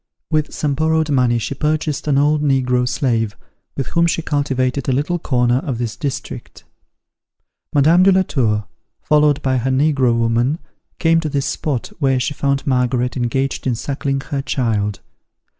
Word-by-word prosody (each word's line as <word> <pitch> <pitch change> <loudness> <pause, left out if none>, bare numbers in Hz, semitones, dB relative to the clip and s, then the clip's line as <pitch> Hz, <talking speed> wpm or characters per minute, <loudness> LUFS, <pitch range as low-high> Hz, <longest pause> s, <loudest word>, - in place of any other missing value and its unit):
With 155 -1 0
some 145 -2 -1
borrowed 160 +1 +1
money 125 -3 +2
she 115 - -3
purchased 155 0 -1
an 140 -2 +2
old 150 +1 +3
negro 125 -3 +1
slave, 115 -4 -1 0.4
with 135 - -1
whom 170 0 +2
she 165 0 -1
cultivated 140 -3 -1
a - - +3
little 150 +7 0
corner 125 -4 +1
of 135 -4 -4
this 115 -2 -3
district. 140 -3 -6 1.1
Madame 155 +5 +4
de 195 +1 +6
la 190 0 +4
Tour, 110 - 0 0.4
followed 150 -1 +3
by 130 -1 +1
her 125 +2 -1
negro 130 -3 +2
woman, 115 +5 +1 0.4
came 165 0 +3
to 160 -2 -3
this 140 -1 -1
spot, 140 -7 -3
where 135 -3 +2
she 140 +3 -1
found 140 0 -1
Margaret 125 -2 0
engaged 130 +2 -1
in 125 - +1
suckling 135 +2 -2
her 140 0 -3
child. 110 -7 -1
135 Hz, 160 wpm, -19 LUFS, 125-150 Hz, 1.1 s, de